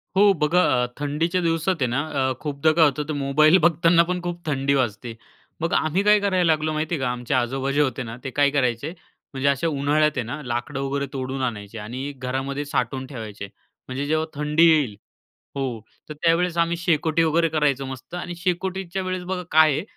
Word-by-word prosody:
हो. 200 Hz, +1 st, +6 dB
बघा, 165 Hz, +1 st, +2 dB, 0.2 s
अ, -, -, -1 dB
थंडीच्या 160 Hz, +5 st, 0 dB
दिवसात 165 Hz, +2 st, +1 dB
आहे 130 Hz, -, +3 dB
ना 125 Hz, +4 st, 0 dB, 0.3 s
अ, -, -, 0 dB
खूपदा 150 Hz, +1 st, +1 dB
काय 165 Hz, 0 st, +5 dB
होतं 145 Hz, 0 st, 0 dB
तर 155 Hz, -, -2 dB
मोबाईल 150 Hz, +4 st, +4 dB
बघताना 170 Hz, 0 st, +4 dB
पण 180 Hz, +1 st, -3 dB
खूप 175 Hz, -1 st, -6 dB
थंडी 140 Hz, -2 st, 0 dB
वाजते. 120 Hz, -3 st, -1 dB, 0.5 s
मग 165 Hz, -, -1 dB
आम्ही 160 Hz, +5 st, +1 dB
काय 210 Hz, 0 st, +5 dB
करायला 190 Hz, -3 st, +1 dB
लागलो 155 Hz, 0 st, 0 dB
माहिती 155 Hz, +2 st, -1 dB
आहे -, -, -4 dB
का? 125 Hz, -, 0 dB
आमचे 125 Hz, 0 st, -4 dB
आजोबा 130 Hz, +2 st, 0 dB
जे 145 Hz, +2 st, +2 dB
होते 135 Hz, -2 st, -1 dB
ना, 115 Hz, 0 st, -7 dB
ते 135 Hz, -, -3 dB
काय 145 Hz, +1 st, +3 dB
करायचे 130 Hz, +1 st, 0 dB, 0.4 s
म्हणजे 135 Hz, +1 st, -1 dB
अशा 140 Hz, +4 st, 0 dB
उन्हाळ्यात 150 Hz, +1 st, +2 dB
आहे 130 Hz, -, 0 dB
ना 135 Hz, +6 st, -5 dB
लाकडं 120 Hz, +3 st, -3 dB
वगैरे 140 Hz, +1 st, -2 dB
तोडून 130 Hz, 0 st, -4 dB
आणायचे 110 Hz, -3 st, -4 dB
आणि 125 Hz, +7 st, -5 dB
घरामध्ये 135 Hz, +3 st, -3 dB
साठवून 130 Hz, -1 st, -2 dB
ठेवायचे. 110 Hz, -6 st, -7 dB, 0.4 s
म्हणजे 130 Hz, +2 st, -3 dB
जेव्हा 155 Hz, +1 st, +1 dB
थंडी 150 Hz, +3 st, +3 dB
येईल 145 Hz, -10 st, +2 dB, 0.6 s
हो. 130 Hz, -5 st, -3 dB, 0.3 s
तर -, -, -4 dB
त्यावेळेस 170 Hz, +2 st, +1 dB
आम्ही 170 Hz, 0 st, +1 dB
शेकोटी 165 Hz, -1 st, +1 dB
वगैरे 165 Hz, +1 st, +2 dB
करायचो 145 Hz, -3 st, +1 dB
मस्त 130 Hz, +4 st, -9 dB
आणि 175 Hz, 0 st, -5 dB
शेकोटीच्या 185 Hz, +1 st, -2 dB
वेळेस 185 Hz, -1 st, -3 dB
बघा 180 Hz, 0 st, -3 dB
काय 155 Hz, 0 st, +6 dB
आहे? -, -, -2 dB
150 Hz, 195 wpm, -23 LUFS, 130-170 Hz, 0.6 s, हो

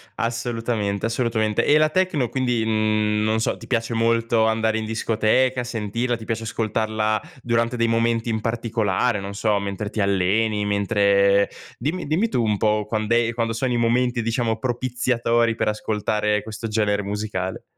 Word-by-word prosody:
Assolutamente, 115 Hz, -3 st, -2 dB
assolutamente, 115 Hz, -2 st, 0 dB
e 150 Hz, -, +4 dB
la 155 Hz, 0 st, +4 dB
techno 165 Hz, -6 st, +1 dB
quindi, 125 Hz, -3 st, 0 dB
mhmm, 110 Hz, -1 st, +1 dB
non 110 Hz, +1 st, +1 dB
so, 110 Hz, -, 0 dB
ti -, -, -12 dB
piace 115 Hz, -1 st, -1 dB
molto 115 Hz, 0 st, +2 dB
andare 110 Hz, 0 st, +1 dB
in 110 Hz, -, -3 dB
discoteca, 115 Hz, +3 st, +1 dB
sentirla, 120 Hz, +1 st, -2 dB
ti 110 Hz, -, -10 dB
piace 115 Hz, 0 st, -3 dB
ascoltarla 110 Hz, -1 st, -1 dB, 0.2 s
durante 115 Hz, 0 st, 0 dB
dei 115 Hz, 0 st, +2 dB
momenti 115 Hz, 0 st, +1 dB
in 110 Hz, -1 st, -1 dB
particolare, 115 Hz, -1 st, 0 dB
non 100 Hz, +1 st, -6 dB
so, 105 Hz, -1 st, +1 dB
mentre 100 Hz, +1 st, -4 dB
ti 110 Hz, -, -2 dB
alleni, 100 Hz, +2 st, +1 dB
mentre 100 Hz, -1 st, +3 dB, 0.3 s
dimmi 155 Hz, +9 st, -3 dB
dimmi 165 Hz, +10 st, +1 dB
tu, 125 Hz, -, 0 dB
un 105 Hz, -2 st, +1 dB
po', 105 Hz, 0 st, +1 dB
quand'è 115 Hz, +2 st, 0 dB
quando 115 Hz, -1 st, -1 dB
sono 125 Hz, +3 st, -1 dB
i 120 Hz, -, +1 dB
momenti, 120 Hz, +1 st, +1 dB
diciamo, 115 Hz, 0 st, -1 dB
propiziatori 120 Hz, -2 st, 0 dB
per 110 Hz, -, 0 dB
ascoltare 105 Hz, -1 st, -1 dB
questo 110 Hz, +1 st, -6 dB
genere 105 Hz, -2 st, 0 dB
musicale. 100 Hz, -2 st, -4 dB
115 Hz, 160 wpm, -22 LUFS, 105-120 Hz, 0.3 s, e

